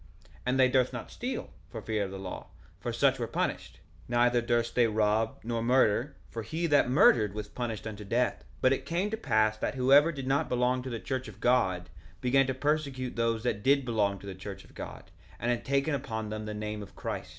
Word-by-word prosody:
1:18 - - -26 0.2
And 130 +1 +1
they 130 - +7
durst 130 0 +2
not 120 - -6
steal, 250 +2 -4 0.2
for 115 - -6
fear 110 -1 -1
of - - -6
the 95 - -7
law, 95 -1 -7 0.3
for - - -3
such - - +2
were - - -1
punished; - - -3 0.3
neither 120 0 +3
durst 120 0 0
they 120 -2 +4
rob, 110 +1 +1
nor 115 0 -2
murder, 125 +2 +2 0.2
for 115 - -4
he 160 +9 -3
that 145 -5 +4
murdered 110 -6 +5
was 105 -1 -4
punished 115 -2 -4
unto 105 -1 -6
death. 120 +5 +1
1:19 - - -22 0.2
But 130 - +5
it - - -3
came 180 +5 0
to 220 - -2
pass 110 - +2
that 110 - -2
whosoever 140 +5 +5
did 135 -4 -6
not 140 +4 +1
belong 125 +1 +1
to 130 - -6
the 115 -2 -4
church 130 0 -3
of 105 - -11
God 95 -8 +2 0.3
began 135 +3 +3
to 130 - -1
persecute 140 -3 -1
those 115 -1 0
that 110 -4 -1
did 140 +2 +3
belong 105 -4 +1
to 100 - -13
the 100 - -5
church 95 +1 -8
of - - -19
God, - - -9 0.3
and 120 - 0
had 120 - -1
taken 140 +2 +1
upon 110 -6 -3
them 110 0 -5
the 105 - -4
name 105 0 -4
of 100 - -11
Christ. - - -5
120 Hz, 230 wpm, -29 LUFS, 110-130 Hz, 0.3 s, they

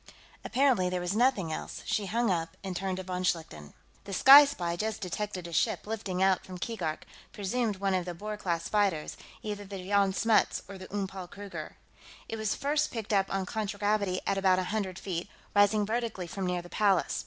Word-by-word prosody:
Apparently 250 -8 +2
there 180 0 -1
was 180 +3 -2
nothing 220 -9 +2
else. - - -6
She 205 -2 -1
hung 230 +2 +1
up, 165 -2 -2
and 190 -2 -4
turned 190 0 -2
to 190 - -4
von 180 0 -3
Schlichten. 120 - -2 0.3
"The 195 - -6
Sky 275 +8 +10
Spy 175 -12 -2
just 215 +3 -2
detected 185 0 -4
a 170 - -7
ship - - +1
lifting 200 -4 -2
out 190 -1 +3
from 185 -1 -8
Keegark, 175 -6 -3 0.3
presumed 215 +2 -1
one 195 0 0
of 180 -2 0
the 175 -1 -5
Boer 210 +4 -5
class 170 -5 -2
freighters, 200 -7 +1 0.3
either 205 -1 -4
the 200 0 -7
Jan 200 -1 +3
Smuts 225 +3 +2
or 195 0 -9
the 185 - -10
Oom 200 -1 -1
Paul 190 -1 -7
Kruger. 200 +2 -8 0.5
It 225 - -4
was 220 -1 -1
first 295 +2 0
picked 220 -3 -4
up 195 -1 +2
on 195 -1 -1
contragravity 205 -2 -1
at 195 0 +1
about 190 -1 +4
a 185 - +1
hundred 190 -4 -2
feet, 180 -3 -4 0.3
rising 205 +1 +4
vertically 225 -4 -2
from 185 +2 -4
near 180 -1 -1
the - - -10
Palace. 195 -3 +2
195 Hz, 200 wpm, -29 LUFS, 180-215 Hz, 0.5 s, Sky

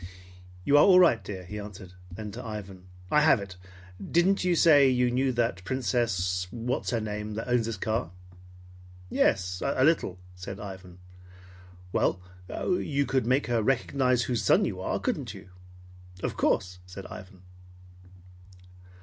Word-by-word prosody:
"You 145 - +5
are - - +7
all 185 -2 +7
right, 165 -11 +4
dear," 95 -3 -7
he 105 +4 -6
answered. 100 -3 -10 0.2
Then 105 +3 -7
to - - -8
Ivan: 100 -4 -8 0.2
"I 150 - +5
have 150 -5 +5
it. 100 -2 -8 0.5
Didn't 180 +4 +2
you 180 -1 +2
say 145 -5 +6
you 125 -1 +2
knew 130 +2 +1
that 115 -5 -1
Princess 95 -7 -1
what 120 +4 -3
is - - -1
her 115 - 0
name 105 0 -5
that 115 - -5
owns 120 -2 +1
this 115 -2 -4
car?" 110 +1 -2 1.0
"Yes, 90 -1 +1
a 130 - +1
little," 150 - +1 0.2
said 95 +2 -8
Ivan. 95 -3 -9 1.0
"Well, 95 - +1 0.3
you 145 -6 -1
could 130 -4 0
make 130 +3 +2
her 120 -2 0
recognize 125 +1 +1
whose 120 -3 -1
son - - +4
you - - -4
are, - - -2
couldn't - - -3
you?" - - -12 0.7
"Of - - -2
course!" 90 -1 0
said 95 +1 -9
Ivan. 95 -2 -11
110 Hz, 155 wpm, -27 LUFS, 95-130 Hz, 1.0 s, are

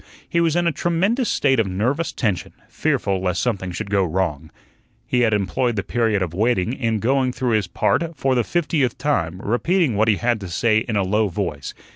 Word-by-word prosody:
He 170 - +1
was 165 -1 +2
in 175 0 +2
a 170 - +3
tremendous 195 - 0
state 135 -3 +2
of 110 - +2
nervous 125 - -1
tension, 105 -8 -2
fearful 95 -2 -1
lest 90 -1 -1
something 100 -7 -1
should 95 +3 -5
go 100 -1 +3
wrong. 80 -3 -2 0.6
He 125 - 0
had 115 -2 +3
employed 105 +4 0
the 100 - -1
period 110 -4 0
of 85 -2 -5
waiting 110 +2 +1
in 115 -4 -1
going 130 +4 +1
through 125 -1 -2
his 105 -4 +1
part 165 - 0
for 135 0 +1
the 120 -2 +2
fiftieth 150 -6 0
time, 95 - -1
repeating 145 - +1
what 110 +2 +2
he 110 - +4
had 120 +1 0
to 95 - -7
say 110 +5 +2
in 110 0 -4
a 100 - +2
low 105 +3 +1
voice. 85 -6 -4
110 Hz, 205 wpm, -21 LUFS, 95-135 Hz, 0.6 s, he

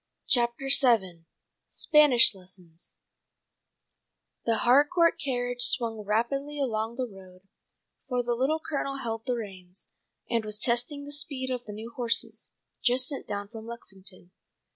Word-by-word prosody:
CHAPTER 240 +2 +1 0.2
VII 190 -10 +1 0.4
SPANISH 290 -7 +5
LESSONS 180 -3 -12 1.5
THE 230 - +2
Harcourt 295 +7 +4
carriage 245 -3 -2
swung 230 -2 +2
rapidly 275 +8 -1
along 225 -3 -2
the 255 0 -2
road, 190 -4 -14 0.7
for 250 -1 0
the 240 0 -1
Little 270 +7 0
Colonel 275 -3 -3
held 225 -2 -5
the 250 - 0
reins, 190 -5 -9 0.4
and 230 -2 0
was 210 -1 -4
testing 245 +5 0
the 290 - -9
speed 280 -3 -3
of 250 -1 -4
the 210 - -8
new 220 +3 -8
horses, 235 -2 0 0.3
just 255 0 +2
sent 280 - -5
down 200 0 -4
from 225 0 -10
Lexington. 195 -6 -5
235 Hz, 135 wpm, -27 LUFS, 210-265 Hz, 1.5 s, SPANISH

